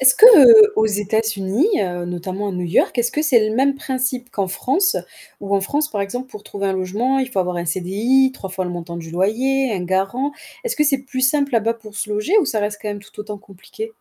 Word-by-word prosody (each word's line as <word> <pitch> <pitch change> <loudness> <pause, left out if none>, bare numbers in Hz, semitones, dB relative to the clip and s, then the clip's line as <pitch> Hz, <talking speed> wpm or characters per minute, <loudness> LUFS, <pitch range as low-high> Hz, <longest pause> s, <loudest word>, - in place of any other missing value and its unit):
est-ce 260 0 +6
que, 440 - +9
heu, 435 -3 +8
aux 220 - +3
États-Unis, 215 - 0 0.2
heu, 175 -1 -4
notamment 185 +3 -5
à - - -4
New 180 0 -4
York 175 +8 +1
est-ce 240 - 0
que 300 - -1
c'est 235 -8 +3
le 215 - -3
même 275 +3 +2
principe 255 -2 -3
qu'en 195 -2 -2
France, 360 - 0 0.4
où 200 0 -2
en 195 - +2
France 290 +9 -1
par 205 - -3
exemple 245 +6 -5
pour 210 -6 -11
trouver 200 -1 -5
un 195 - 0
logement, 205 +8 -1
il 260 -1 -1
faut 195 - -3
avoir 180 -1 -1
un 170 - -3
CDI, 205 +10 +1
3 195 -7 -9
fois 185 0 -3
le 180 - -4
montant 170 -1 -7
du 165 -1 -8
loyer, 245 +8 0
un 185 -3 -3
garant? 195 +10 -1 0.3
Est-ce 475 - -2
que 300 - +2
c'est 275 -2 +2
plus 260 0 -6
simple 280 +1 +1
là-bas 230 0 +1
pour 215 -2 -14
se 210 - -4
loger 210 - 0
ou 385 - +2
ça 220 -6 -1
reste 205 0 -3
quand 210 - -4
même 205 0 -5
tout - - -20
autant 210 -1 -7
compliqué? 320 - -10
215 Hz, 245 wpm, -19 LUFS, 190-265 Hz, 0.4 s, que